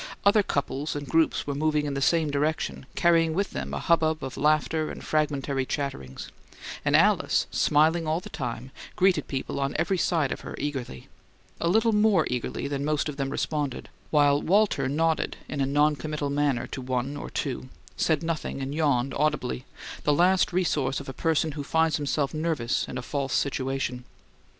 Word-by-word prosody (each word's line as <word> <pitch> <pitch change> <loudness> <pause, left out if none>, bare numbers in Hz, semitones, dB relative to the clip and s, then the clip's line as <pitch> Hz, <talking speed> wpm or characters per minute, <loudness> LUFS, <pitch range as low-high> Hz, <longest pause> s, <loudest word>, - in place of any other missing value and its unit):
Other 205 +1 +6
couples 145 -4 -2
and 145 -1 -5
groups 160 +4 +2
were 145 - -2
moving 150 +1 +1
in 145 - -2
the 140 - -2
same 160 +1 +2
direction, 145 -2 -1
carrying 165 -2 +3
with 200 +2 0
them 70 0 -4
a 70 - -2
hubbub 160 - +2
of 130 -1 -5
laughter 155 +1 +1
and - - -8
fragmentary 140 -3 0
chatterings; 130 - -4 0.5
and - - +2
Alice, - - +3
smiling 160 +2 +3
all 160 +2 +1
the - - -10
time, 125 0 -5 0.2
greeted 185 -5 +2
people 135 0 -3
on 140 0 -1
every 190 -2 +1
side 160 -6 +1
of - - -4
her - - -7
eagerly 135 - -4 0.5
a 170 - 0
little 220 +5 +3
more 210 -6 +4
eagerly 125 +2 -3
than 140 -1 -2
most 150 0 0
of 145 - -6
them 135 -1 -1
responded 145 -1 -2 0.2
while 145 -1 +4
Walter 190 -8 +2
nodded 160 +3 0
in 145 - -3
a 135 - +1
noncommittal 150 0 +1
manner 140 -4 +1
to 130 - -6
one 130 +2 -2
or 145 - -6
two, 130 -1 -3 0.3
said 160 0 +1
nothing, 165 -4 -3
and 135 +1 -4
yawned 140 -4 +1
audibly, 140 -4 -1 0.4
the 150 - +3
last 180 +4 +3
resource 150 -7 0
of 140 - -8
a - - -5
person 160 +1 +1
who 145 0 -5
finds 160 +2 +2
himself 145 -1 -1
nervous 155 -7 -1
in - - -5
a 125 - -4
false 135 -1 -2
situation. 135 -2 -1
145 Hz, 180 wpm, -26 LUFS, 135-160 Hz, 0.5 s, Other